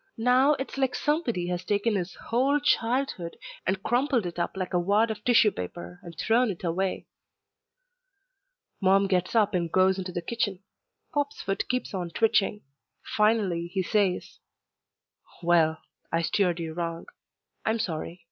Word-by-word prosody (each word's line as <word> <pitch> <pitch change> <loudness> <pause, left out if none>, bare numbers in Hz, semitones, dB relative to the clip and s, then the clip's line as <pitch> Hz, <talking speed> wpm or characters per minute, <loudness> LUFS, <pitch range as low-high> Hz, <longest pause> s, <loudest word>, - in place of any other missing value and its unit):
Now 250 +5 +4
it's 270 0 -5
like 265 -2 +1
somebody 275 - 0
has 180 0 -2
taken 210 +2 +1
his 185 -2 -2
whole 265 +5 +1
childhood 240 -9 0 0.3
and 190 +1 0
crumpled 245 -3 +1
it 175 0 -5
up 170 - -2
like 185 -1 -3
a 180 - +3
wad 205 +5 +2
of 210 -1 -7
tissue 230 -3 +5
paper 90 - -7
and 170 -1 -11
thrown 235 +2 +2
it 185 -3 -5
away. 185 +2 -1 1.8
Mom 195 +1 +4
gets 185 +1 0
up 210 -2 +3
and 170 -3 -1
goes 190 +1 +3
into 185 -1 -4
the 175 -1 -4
kitchen. 200 -2 -2 0.5
Pop's 290 -1 -1
foot 195 0 -2
keeps 250 -3 -2
on 180 -3 -3
twitching. 210 +1 +1 0.5
Finally 210 -6 +2
he 190 - +1
says, 195 -1 0 1.0
"Well, 165 -2 +3 0.3
I 165 0 +1
steered 180 -1 +1
you 165 -1 -4
wrong. 165 0 -4 0.6
I'm 220 +1 +1
sorry. 170 -3 -4
195 Hz, 150 wpm, -27 LUFS, 175-230 Hz, 1.8 s, tissue